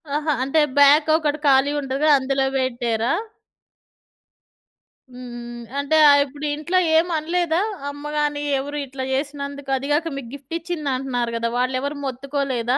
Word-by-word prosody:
ఆహా! 300 Hz, 0 st, 0 dB
అంటే 275 Hz, +4 st, +1 dB, 0.2 s
బ్యాక్ 290 Hz, +2 st, +6 dB
ఒకటి 305 Hz, -1 st, -1 dB
ఖాళీ 270 Hz, +1 st, +4 dB
ఉంటది 275 Hz, +2 st, -1 dB
అందులో 270 Hz, 0 st, 0 dB
బెట్టారా? 240 Hz, -2 st, 0 dB, 2.0 s
హ్మ్. 250 Hz, -, -10 dB
హ్మ్. -, -, -7 dB, 0.2 s
హ్మ్. -, -, -8 dB, 0.2 s
అంటే 285 Hz, +3 st, +1 dB
ఆహ్, 285 Hz, 0 st, +6 dB
ఇప్పుడు 290 Hz, +2 st, -8 dB
ఇంట్లో 310 Hz, +5 st, -1 dB, 0.2 s
ఏం 325 Hz, +2 st, +4 dB
అనలేదా? 335 Hz, +2 st, 0 dB, 0.3 s
అమ్మ 290 Hz, +1 st, -7 dB
గాని 295 Hz, -1 st, 0 dB, 0.2 s
ఎవరు 290 Hz, +2 st, -5 dB
ఇట్లా 265 Hz, 0 st, -6 dB
జేసినందుకు 280 Hz, 0 st, -4 dB
అదీ 270 Hz, +2 st, -5 dB
గాక 325 Hz, +2 st, 0 dB
మీకు 255 Hz, -4 st, -7 dB
గిఫ్ట్ 285 Hz, +3 st, -8 dB
ఇచ్చిందంటున్నారు 270 Hz, -8 st, -2 dB
గదా! 230 Hz, 0 st, -1 dB
వాళ్ళెవరు 255 Hz, +3 st, -1 dB
మొత్తుకోలేదా? 265 Hz, -2 st, -1 dB
280 Hz, 140 wpm, -22 LUFS, 260-295 Hz, 2.0 s, బ్యాక్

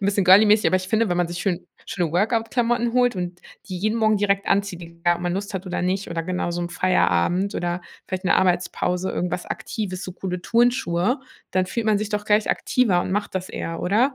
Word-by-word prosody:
'n 195 Hz, -, -3 dB
bisschen 200 Hz, -1 st, +2 dB
girly-mäßig, 210 Hz, +3 st, +7 dB
aber 185 Hz, -, +4 dB
ich 185 Hz, 0 st, -4 dB
finde, 220 Hz, -1 st, +2 dB
wenn 175 Hz, -, 0 dB
man 175 Hz, -1 st, +1 dB
sich 175 Hz, -, -5 dB
schön 180 Hz, -3 st, -2 dB, 0.2 s
schöne 175 Hz, -4 st, -2 dB
Workout-Klamotten 230 Hz, +4 st, +1 dB
holt 245 Hz, -3 st, +2 dB
und 180 Hz, 0 st, -4 dB, 0.3 s
die 185 Hz, -3 st, -5 dB
jeden 215 Hz, +4 st, 0 dB
Morgen 215 Hz, -2 st, +3 dB
direkt 200 Hz, -1 st, +1 dB
anzieht, 195 Hz, -3 st, 0 dB
egal 170 Hz, +1 st, -1 dB
ob 175 Hz, -, -9 dB
man 175 Hz, 0 st, -1 dB
Lust 200 Hz, +1 st, -4 dB
hat 190 Hz, 0 st, -3 dB
oder 180 Hz, -2 st, -3 dB
nicht, 185 Hz, +2 st, -1 dB
oder 165 Hz, -1 st, -2 dB
genau 180 Hz, 0 st, -2 dB
so 175 Hz, 0 st, -3 dB
im 175 Hz, -, -3 dB
Feierabend 180 Hz, -, +1 dB
oder 175 Hz, 0 st, -2 dB, 0.3 s
vielleicht 185 Hz, 0 st, -4 dB
'ne -, -, +4 dB
Arbeitspause, 180 Hz, 0 st, 0 dB
irgendwas 180 Hz, 0 st, -3 dB
Aktives, 190 Hz, -4 st, -4 dB
so 185 Hz, -, -6 dB
coole 180 Hz, -1 st, -5 dB
Turnschuhe, 240 Hz, -2 st, +1 dB, 0.3 s
dann 185 Hz, 0 st, +2 dB
fühlt 225 Hz, +4 st, -3 dB
man 215 Hz, -1 st, +4 dB
sich 210 Hz, +1 st, -3 dB
doch 210 Hz, 0 st, -2 dB
gleich 210 Hz, 0 st, +3 dB
aktiver 215 Hz, -9 st, +2 dB
und 185 Hz, -, -3 dB
macht 205 Hz, -1 st, -2 dB
das 185 Hz, 0 st, -3 dB
eher, 165 Hz, 0 st, -5 dB
oder? 235 Hz, +9 st, +2 dB
190 Hz, 220 wpm, -23 LUFS, 180-215 Hz, 0.3 s, girly-mäßig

